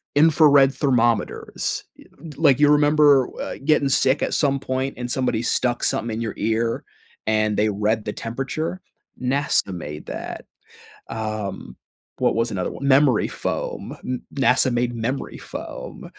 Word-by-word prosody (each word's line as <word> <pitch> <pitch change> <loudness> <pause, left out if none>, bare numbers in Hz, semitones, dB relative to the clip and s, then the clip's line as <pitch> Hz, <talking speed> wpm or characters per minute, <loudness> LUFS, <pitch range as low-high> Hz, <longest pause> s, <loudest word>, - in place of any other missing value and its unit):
infrared 145 -3 +5
thermometers. 120 -5 0 0.2
Eh - - -15 0.3
like, 145 -4 +4
you 145 0 +5
remember, 145 -2 +5
uh, - - -5
gettin' 150 -2 +3
sick 135 +1 +2
at - - -1
some 140 -2 +1
point 130 0 -3
and 125 0 -4
somebody 125 -4 0
stuck 120 0 0
somethin' 115 0 0
in 115 - -4
your 110 -3 -3
ear 115 +2 -1 0.4
and 110 -1 +1
they 105 +1 +2
read 105 +2 0
the 105 - -3
temperature? 135 +9 -4 0.4
NASA 135 -5 +1
made 75 -3 -7
that. - - -6 0.6
Um, 110 - -5 0.4
what - - +2
was 115 0 0
another 90 -2 -2
one? 140 - -5
Memory 135 -4 +4
foam, - - -4
m 125 -1 -3
NASA 130 -1 +3
made 120 0 0
memory 120 +4 -3
foam. - - -8
125 Hz, 145 wpm, -22 LUFS, 110-140 Hz, 0.6 s, infrared